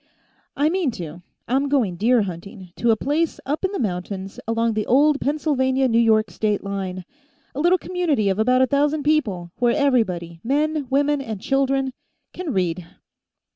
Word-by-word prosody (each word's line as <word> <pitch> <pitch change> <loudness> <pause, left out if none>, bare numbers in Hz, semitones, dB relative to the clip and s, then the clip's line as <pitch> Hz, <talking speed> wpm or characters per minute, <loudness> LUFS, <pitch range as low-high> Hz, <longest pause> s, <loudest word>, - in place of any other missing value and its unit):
"I 290 - +3
mean 355 -4 0
to. 170 -2 -7 0.3
I'm 270 +3 +1
going 240 -11 +1
deer 230 +4 +3
hunting, 185 0 -8
to 235 - +1
a 225 - +5
place 300 +8 -1
up 295 +6 -2
in 380 - 0
the 400 - -3
mountains, 190 -2 -4
along 230 0 +1
the 215 -1 -2
old 285 +3 +4
Pennsylvania 270 -3 +1
New 230 -1 +3
York 220 -2 +3
state 210 -2 -1
line. 190 -2 -4 0.5
A 270 - -5
little 350 +4 +4
community 340 - 0
of 195 +1 0
about 250 +3 +4
a - - +5
thousand 290 +3 +1
people, 210 - 0
where 240 -1 +2
everybody, 185 - 0
men, 295 +2 0
women 285 +1 +2
and 220 -6 -5
children, 270 +2 0 0.4
can 355 -4 -4
read." 180 -4 -1
250 Hz, 170 wpm, -22 LUFS, 200-285 Hz, 0.5 s, a